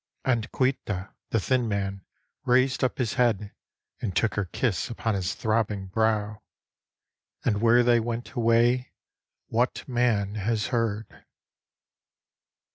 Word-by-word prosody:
And 120 -4 0
Caoilte, 105 -7 -1 0.2
the 115 - +1
thin 125 +3 +1
man, 100 -2 -2 0.4
raised 130 0 +2
up 130 - +1
his 120 -5 -1
head 105 -4 +1 0.5
And 95 -6 -3
took 110 -5 +2
her 105 0 -1
kiss 95 +1 -1
upon 115 -1 -2
.his 95 -2 -2
throbbing 110 -3 0
brow. 105 0 0 1.0
And 105 -2 +1
where 120 +1 +5
they 120 -1 +4
went 115 +1 -4
away 120 +1 +2 0.6
what 120 +3 0
man 120 -6 +1
has 110 +1 0
heard? 110 -2 -2
115 Hz, 120 wpm, -26 LUFS, 105-120 Hz, 1.0 s, where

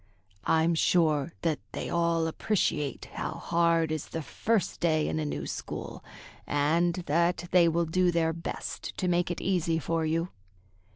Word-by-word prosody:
"I'm 160 +1 +3
sure 160 -2 +2
that 160 -4 +1
they - - -4
all 170 -1 +1
appreciate 155 - -1
how - - -3
hard 170 -1 +1
is 155 -2 -3
the 160 - -5
first 220 +6 -1
day 155 -2 +2
in 155 - -1
a 155 - -1
new 145 - -3
school, - - -6 0.4
and 165 +4 +2
that 170 +3 +1
they 175 -1 +6
will 170 +1 +1
do 180 +3 +2
their 165 -1 +1
best 165 +1 -6
to 185 - -1
make 175 0 +2
it 175 - -3
easy 170 -3 +1
for 165 +1 -1
you." 165 +2 0
165 Hz, 160 wpm, -29 LUFS, 160-175 Hz, 0.4 s, they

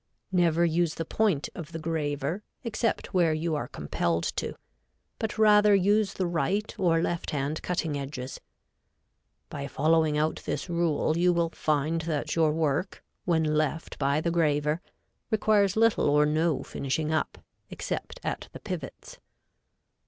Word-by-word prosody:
Never 170 -2 +3
use 170 0 +1
the 165 - -3
point 195 -6 +1
of 170 -1 -8
the - - -3
graver, 155 +1 -2 0.2
except 230 -1 -2
where 170 -4 +3
you 160 +1 -1
are 145 -5 -2
compelled 85 +1 -1
to, - - -2 0.6
but 220 -1 -3
rather 210 -1 +6
use 200 +1 +3
the 185 - 0
right 175 +5 -1
or 165 -3 +3
left 175 -1 -2
hand 145 +1 -2
cutting 165 -4 -2
edges. 135 -2 -5 1.1
By 140 -2 -5
following 155 +1 +2
out 155 +1 +1
this - - -3
rule 170 -3 +1
you 180 +1 +4
will 170 -1 +1
find 155 +1 0
that 155 -2 -2
your 160 -2 +3
work, 155 +3 -1 0.2
when 165 -3 +2
left 155 +1 -1
by 140 +1 +2
the 170 - 0
graver, 150 -1 +1 0.5
requires 210 -3 +3
little 225 -8 +4
or 150 +1 +4
no 155 +1 +1
finishing 150 +3 -2
up, 155 - -1 0.3
except - - -5
at - - -4
the - - -8
pivots. - - -7
160 Hz, 145 wpm, -28 LUFS, 150-180 Hz, 1.1 s, rather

